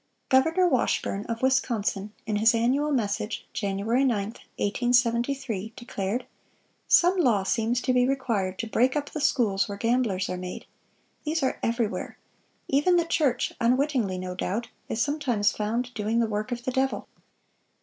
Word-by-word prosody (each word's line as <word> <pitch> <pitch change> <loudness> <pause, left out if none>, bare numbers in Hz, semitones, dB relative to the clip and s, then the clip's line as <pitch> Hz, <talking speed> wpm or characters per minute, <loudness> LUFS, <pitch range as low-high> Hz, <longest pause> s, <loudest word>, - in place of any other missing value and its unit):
Governor 320 +8 +4
Washburn, 205 - 0
of 230 +1 -4
Wisconsin, 220 -6 0
in 215 -2 -1
his 225 +2 +4
annual 265 +6 +1
message, 215 -4 -1
Jan. 195 -3 -2
9, 200 - -4 0.2
1873, 235 +1 0
declared: 225 -1 -3 0.6
"Some 355 +2 +5
law 235 - +3
seems 230 +4 0
to 255 - +1
be 250 0 +3
required 230 -9 -1
to 225 - -3
break 250 +5 +2
up 290 -1 -2
the 305 - -4
schools 230 -9 +2
where 200 - -5
gamblers 230 -4 +1
are 180 - -3
made. 180 0 -6 0.6
These 315 0 -1
are 260 - 0
everywhere. 230 -2 -2 0.5
Even 295 +7 +3
the 340 -1 +3
church 285 -7 +1
(unwittingly, 245 -5 +1
no 180 0 -4
doubt) 205 +5 -3 0.2
is 220 - -2
sometimes 250 -7 +1
found 235 +4 -2
doing 220 +1 -1
the 235 - +3
work 215 +2 -3
of 240 0 -3
the 255 - -1
devil. 265 +1 -1
235 Hz, 150 wpm, -26 LUFS, 210-265 Hz, 0.6 s, Some